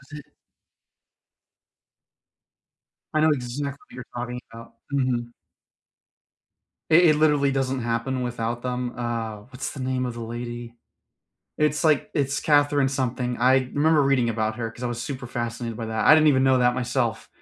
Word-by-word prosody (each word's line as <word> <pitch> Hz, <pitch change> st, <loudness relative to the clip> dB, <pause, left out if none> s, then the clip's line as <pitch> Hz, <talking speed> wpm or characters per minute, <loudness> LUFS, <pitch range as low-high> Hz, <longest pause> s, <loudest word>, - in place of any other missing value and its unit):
Was 145 Hz, +2 st, -11 dB
it 150 Hz, -, -12 dB, 2.9 s
I 155 Hz, -, +2 dB
know 155 Hz, -, +5 dB
exactly 140 Hz, 0 st, -2 dB
what -, -, -18 dB
you're 125 Hz, -, -8 dB
talking 125 Hz, 0 st, -4 dB
about, 115 Hz, 0 st, -11 dB, 0.2 s
mhm. 125 Hz, -3 st, 0 dB, 1.6 s
It 170 Hz, +3 st, +6 dB
it 155 Hz, -, +4 dB
literally 150 Hz, -2 st, +3 dB
doesn't 135 Hz, -1 st, -1 dB
happen 120 Hz, +3 st, -1 dB
without 120 Hz, -1 st, -3 dB
them, 125 Hz, -1 st, -3 dB
uh, 115 Hz, -3 st, -3 dB
what's 130 Hz, +2 st, -5 dB
the -, -, -9 dB
name 130 Hz, 0 st, -1 dB
of 125 Hz, -, -3 dB
the 120 Hz, -, -7 dB
lady? 120 Hz, +1 st, -6 dB, 0.8 s
It's, 150 Hz, +1 st, +1 dB
like, 155 Hz, -3 st, +2 dB
it's 140 Hz, -1 st, 0 dB
Catherine 145 Hz, -2 st, +3 dB
something, 125 Hz, -2 st, -2 dB
I 130 Hz, +1 st, +3 dB
remember 155 Hz, +1 st, +3 dB
reading 135 Hz, -3 st, +2 dB
about 110 Hz, -1 st, -1 dB
her 115 Hz, -2 st, -3 dB
because 115 Hz, +2 st, -12 dB
I -, -, +1 dB
was 120 Hz, -1 st, -4 dB
super 130 Hz, -1 st, -5 dB
fascinated 120 Hz, -1 st, -4 dB
by 115 Hz, -, -5 dB
that, 110 Hz, 0 st, -1 dB
I -, -, +9 dB
didn't 155 Hz, 0 st, +5 dB
even 130 Hz, -2 st, +4 dB
know 130 Hz, -1 st, +4 dB
that 125 Hz, 0 st, +3 dB
myself 125 Hz, -2 st, -1 dB
125 Hz, 160 wpm, -24 LUFS, 120-140 Hz, 2.9 s, I